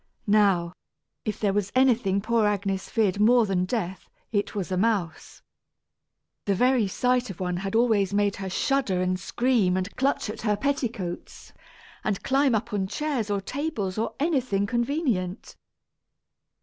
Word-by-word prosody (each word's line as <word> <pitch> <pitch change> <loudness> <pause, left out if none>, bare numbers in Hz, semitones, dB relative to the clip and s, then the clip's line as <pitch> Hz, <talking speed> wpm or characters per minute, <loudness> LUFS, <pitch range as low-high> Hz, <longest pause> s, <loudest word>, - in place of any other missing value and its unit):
Now, 195 -5 +3 0.5
if 215 - -3
there 200 -2 +1
was 205 -1 -1
anything 235 -7 +3
poor 225 0 +2
Agnes 195 -2 -2
feared 205 -5 +1
more 235 +2 +5
than 185 -3 0
death, 190 -4 -4 0.2
it 205 -2 -1
was 190 -2 -3
a - - +1
mouse. 185 -5 -1 1.0
The 200 - +1
very 250 0 +3
sight 250 +4 0
of 190 - -8
one 180 -1 -2
had 195 +3 -3
always 220 -5 +3
made 205 0 +1
her 195 -1 -4
shudder 230 -2 0
and 185 0 0
scream 210 -3 +1
and 185 +2 -4
clutch 270 -1 0
at 210 - -6
her 210 -2 +1
petticoats, 235 -9 -4 0.5
and 205 -3 -2
climb 270 -2 +3
up 220 +1 -3
on 195 -2 0
chairs 270 -3 -2
or 200 -1 0
tables 220 -6 -3
or 225 - -2
anything 255 - +1
convenient. 235 - -2
210 Hz, 150 wpm, -26 LUFS, 190-245 Hz, 1.0 s, more